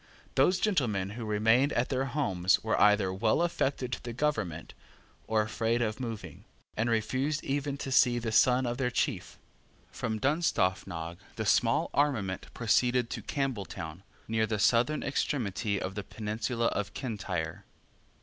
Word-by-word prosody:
Those 160 +8 +3
gentlemen 110 - 0
who 115 +1 -6
remained 110 +6 +3
at 120 - 0
their 135 0 0
homes 95 -10 +1
were 110 - +1
either 105 -2 +4
well 110 - +2
affected 135 -6 -1
to - - -3
the 120 - -5
government 115 - -2 0.5
or 110 -1 +2
afraid 115 +2 0
of 110 +1 -2
moving, 110 - -6 0.3
and 115 +2 0
refused 130 +7 0
even 140 0 -2
to 135 - -5
see 125 -2 +5
the 115 -1 -2
son 125 +3 +4
of 120 +1 -2
their 130 -2 +1
chief. 125 - -2 0.5
From 110 -3 -3
Dunstaffnage 95 - 0 0.2
the - - -3
small - - +2
armament 115 -11 0
proceeded 120 +1 +2
to - - -4
Campbelltown, 95 - -4 0.3
near 110 0 +1
the 110 0 -1
southern 120 +8 +2
extremity 115 -7 -1
of 95 - -4
the 105 0 -4
peninsula 110 +3 -3
of 100 -1 -3
Kintyre. 100 - -4
115 Hz, 150 wpm, -30 LUFS, 100-130 Hz, 0.5 s, see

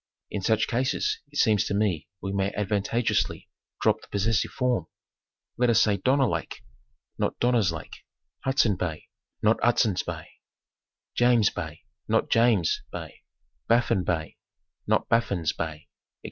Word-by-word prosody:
In 105 - -3
such 110 +3 +2
cases 130 +3 0
it 145 - -7
seems 105 -7 +4
to 100 - -2
me 100 -7 0 0.2
we 95 - -2
may 100 0 0
advantageously 105 +3 0 0.3
drop - - +2
the - - -15
possessive 105 +2 0
form. 125 -10 -1 0.7
Let 125 0 +3
us 115 -1 +5
say 105 -3 +3
Donner 130 +7 +3
Lake, - - -4 0.6
not - - -1
Donner's 120 -7 +3
Lake, 80 -1 -8 0.4
Hudson 130 -7 +2
Bay, 80 -4 -4 0.3
not 110 +1 +3
Hudson's 110 -5 +3
Bay, - - -6 0.9
James 120 -4 +4
Bay, 80 -3 -6 0.3
not - - +1
James' 115 -7 +3
Bay, - - -8 0.5
Baffin 115 -4 +3
Bay, 80 -3 -2 0.5
not - - +2
Baffin's 100 -8 +1
Bay, - - -2
etc. 75 - -16
105 Hz, 140 wpm, -26 LUFS, 95-120 Hz, 0.9 s, us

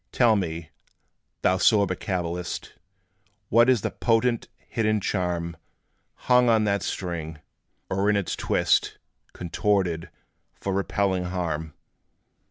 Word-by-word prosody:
Tell 120 -3 +4
me, 85 -5 -3 0.7
thou 95 - +3
sober 100 -1 +4
cabalist, 90 -2 -4 0.8
What 120 +3 +5
is 125 -5 +4
the - - -2
potent, 115 0 +1 0.2
hidden 110 -2 +1
charm 90 -3 -2 0.7
Hung 125 -1 +5
on 110 -1 +4
that 100 -1 +1
string, 85 -4 -4 0.5
or 95 +2 +1
in 105 - +3
its 100 -3 -1
twist - - +1 0.4
Contorted, 90 -1 0 0.5
for 100 - -3
repelling 95 -1 0
harm? 80 -4 -3
95 Hz, 110 wpm, -25 LUFS, 85-110 Hz, 0.8 s, What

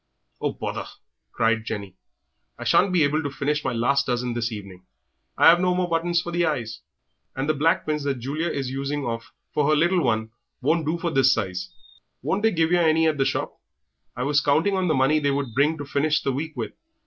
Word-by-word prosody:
"Oh, - - -1
bother!" - - -5 0.4
cried 115 0 +1
Jenny, 100 -3 -5 0.6
"I - - -7
shan't 190 0 +3
be 175 -3 +3
able 150 +2 +1
to 145 - -3
finish 150 +2 -2
my - - -1
last 140 +4 +1
dozen 125 -1 -1
this 120 0 -2
evening. 95 -4 -9 0.5
I - - +8
'ave 175 +1 +3
no 180 -1 +2
more 180 0 0
buttons 170 0 +1
for 175 - -5
the 175 0 +1
eyes, 120 -9 -2 0.6
and 135 +2 -2
the 155 - +3
black 155 +3 +1
pins 150 -1 -1
that 140 -2 0
Julia 145 +7 -3
is 140 -5 -2
a - - -7
using 140 +1 -3
of 115 -1 -4 0.2
for 150 -1 +2
her 155 - +4
little 175 +4 +3
one 110 -3 0 0.3
won't 155 +3 +1
do 165 +2 0
for 170 0 -2
this 135 -3 +4
size." 95 -6 -2 0.5
"Won't 195 - 0
they 225 - +4
give 165 -4 +1
yer 175 -1 +4
any 160 0 +3
at 155 -2 0
the 135 - +3
shop? - - -2 0.6
I 125 - -3
was 145 +1 +2
counting 160 +7 +2
on 185 -1 0
the 155 - +2
money 135 +4 +3
they 145 -1 +1
would 140 -4 -2
bring 150 +6 +2
to 145 - -6
finish 145 +2 +1
the 135 - 0
week 155 +4 -4
with." - - -3
145 Hz, 225 wpm, -24 LUFS, 125-160 Hz, 0.6 s, I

